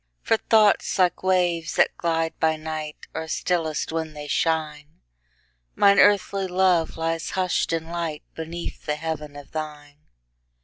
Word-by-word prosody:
For 225 - +3
thoughts, 215 -2 +3
like 180 -2 +2
waves 180 -3 +1
that - - +3
glide 165 -1 -1
by 160 0 +2
night, 155 -1 -6
Are 160 0 -4
stillest 160 -2 -1
when 160 -1 -3
they 150 -1 -7
shine; 150 - -1 0.8
Mine 200 0 +5
earthly 200 -1 +4
love 180 -3 +2
lies 165 0 -2
hush'd 185 -3 0
in 165 -1 -1
lightBeneath 165 0 -5
the 150 - +1
heaven 150 -2 -5
of 145 -1 -11
thine. 150 -2 -7
165 Hz, 135 wpm, -24 LUFS, 155-180 Hz, 0.8 s, Mine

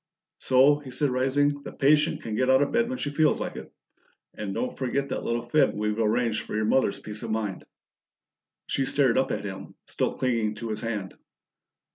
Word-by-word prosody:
"So!" 135 +3 +4
he 145 -3 -10
said, 130 +2 -1
rising. 140 +3 +1
"The - - -8
patient 150 +2 +2
can 110 - -5
get 130 +4 +1
out 130 +2 +5
of 145 - -2
bed 235 0 +1
when 260 - -3
she 145 - -3
feels 155 +1 +3
like - - -4
it - - -9 0.6
and 105 -2 -5
don't 125 - -3
forget 135 +2 -2
that - - -3
little 120 0 -2
fib 150 +5 +3
we've 105 +1 -1
arranged 115 +1 +1
for - - -7
your 110 0 0
mother's 110 -1 +2
peace 105 0 -8
of 115 - -5
mind." 110 -3 -2 1.0
She 135 -1 -1
stared 135 -4 +3
up 130 - 0
at - - -3
him, 95 -1 -7
still - - -2
clinging 115 -4 0
to 115 +1 -6
his 110 - -4
hand. 105 -5 -4
125 Hz, 200 wpm, -26 LUFS, 110-140 Hz, 1.0 s, out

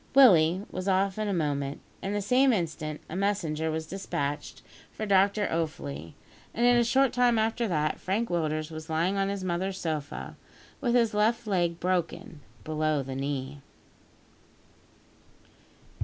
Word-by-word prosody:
Willie 185 -8 +6
was 185 +1 -4
off 195 +1 +1
in 215 - -1
a - - 0
moment. 145 -5 -1 0.2
At 195 - -3
the 205 0 -1
same 255 +6 +4
instant, 160 -6 -2
a 160 - -7
messenger 175 -6 0
was 160 0 -2
despatched 155 -5 -4 0.3
for 215 - -5
Dr 200 +1 +3
Offley, 85 - -3 0.4
and 235 - +2
in 245 0 +6
a 240 - +4
short 260 +2 +3
time 245 -1 +3
after 225 +2 +1
that, 155 -5 0
Frank 210 +5 -1
Willders 155 -2 -1
was 160 +1 -8
lying 165 +5 +1
on 195 0 +1
his 200 -1 -3
mother's 185 +2 -2
sofa, 155 -3 -4 0.4
with 240 -2 +1
his 230 -3 +3
left 220 +3 +1
leg 175 -4 0
broken 175 -3 -2 0.2
below 155 -2 0
the 135 0 -6
knee. 140 0 -4
180 Hz, 150 wpm, -28 LUFS, 155-205 Hz, 0.4 s, Willie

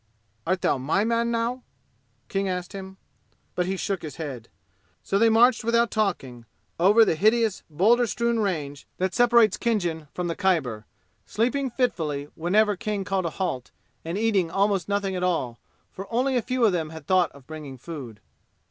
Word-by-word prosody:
"Art 185 +1 0
thou - - +1
my 155 +10 +1
man 230 +1 +1
now?" 235 +2 -1 0.7
King 195 0 -1
asked 180 +1 -4
him. 190 -1 -8 0.6
But 180 0 -1
he 190 +1 -2
shook 195 0 -2
his 155 - -7
head. 135 -8 -7 0.5
So 195 - 0
they 230 +1 +5
marched 230 +2 +4
without 235 0 +2
talking 135 - -2 0.3
over 210 +6 +6
the - - +2
hideous 215 +4 +2
boulder 225 +10 +3
strewn 235 +1 0
range 150 -9 -3
that 185 0 -1
separates 235 -4 +4
Khinjan 175 -10 -1
from 180 - -4
the 170 -1 -2
Khyber, 135 - 0 0.4
sleeping 260 +5 0
fitfully 160 - -1
whenever 205 +5 +2
King 210 0 -3
called 190 -1 -1
a 160 - -8
halt, 130 -10 -2 0.3
and 165 +3 -4
eating 205 -6 +1
almost 195 0 0
nothing 200 -1 -1
at 180 - -3
all, 165 -10 -1 0.3
for 195 +3 -9
only 255 +3 +1
a 245 - +2
few 250 +1 +1
of 215 - +4
them 165 -4 -2
had 160 -2 -10
thought 185 -2 +3
of 140 -2 -16
bringing 150 -3 -8
food. 125 -7 -9
190 Hz, 175 wpm, -25 LUFS, 160-225 Hz, 0.7 s, over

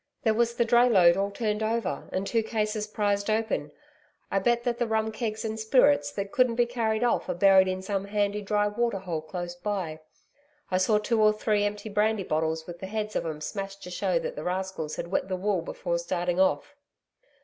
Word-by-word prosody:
There 220 - +3
was 235 +1 +1
the 235 - +2
dray 240 +2 +5
load 175 -6 +6
all 195 +1 0
turned 210 +1 -2
over, 220 -2 -2
and 190 +1 -2
two 230 +2 +1
cases 215 -1 -2
prized 205 -1 -1
open. 215 -9 -1 0.6
I 195 - +2
bet 235 +4 +1
that 240 -1 -1
the 240 - +1
rum 220 0 0
kegs 220 0 -3
and 220 0 -3
spirits 215 - +4
that 200 0 -4
couldn't 250 -2 +2
be 240 0 +3
carried 230 -2 -1
off, 240 - +1
are - - -1
buried 190 +1 +6
in 185 0 -3
some 195 0 -2
handy 205 0 -1
dry 205 0 +1
water 230 0 -1
hole 175 -4 -4
close 175 +2 -5
by. 175 -4 -4 0.7
I 185 - +2
saw 210 +3 +3
two 220 +1 +1
or 215 0 +6
three 210 -1 +1
empty 205 +1 -3
brandy 210 0 +1
bottles 160 -1 -1
with 175 0 -9
the 190 - -6
heads 215 +1 -4
of - - -1
'em 155 -1 -5
smashed 195 +3 -5
to 180 - -8
show 340 - 0
that - - -3
the - - -6
rascals 185 -4 -3
had 170 - -5
wet 190 - 0
the 185 -1 -2
wool 195 -1 0
before 170 +1 -3
starting 175 +1 -1
off.' 240 +9 +1
205 Hz, 215 wpm, -27 LUFS, 185-220 Hz, 0.7 s, load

